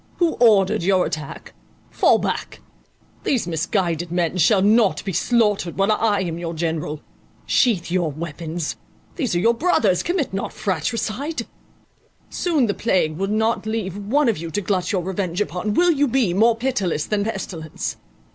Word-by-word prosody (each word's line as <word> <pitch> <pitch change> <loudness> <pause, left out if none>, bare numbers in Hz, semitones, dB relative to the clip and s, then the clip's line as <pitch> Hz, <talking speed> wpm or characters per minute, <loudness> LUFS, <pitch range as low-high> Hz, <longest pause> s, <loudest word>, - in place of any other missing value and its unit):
Who 340 -2 +2
ordered 215 -3 +4
your 185 +1 +2
attack? 155 0 -6 0.4
Fall - - +4
back; - - -3 0.6
these 255 -9 0
misguided 170 0 -1
men 175 -1 0
shall 190 +4 +4
not 215 0 +3
be 195 - -3
slaughtered, 210 -2 +1
while 195 +2 +2
I 210 -2 +2
am 170 -2 -3
your 170 -1 -4
general. 160 -2 -3 0.4
Sheath 205 -10 +2
your 175 -4 +1
weapons; 160 +1 -5 0.4
these 255 - -1
are - - +2
your 230 +6 +3
brothers, 230 - +2
commit 345 - -1
not 195 - -3
fratricide; 230 - -2 0.9
soon 320 -8 +1
the 205 - 0
plague 180 -9 0
will 195 +2 -1
not 220 +1 0
leave 215 -4 -2
one 225 +9 +1
for - - -8
you 165 0 -5
to 205 +5 -2
glut 185 -2 -1
your 185 -3 0
revenge 185 -1 -3
upon: 205 +1 -2
will 350 0 +4
you 290 -2 +2
be 245 -7 +1
more 225 +4 +4
pitiless 225 - -1
than 210 -1 0
pestilence? 180 -7 -5
195 Hz, 160 wpm, -21 LUFS, 175-230 Hz, 0.9 s, ordered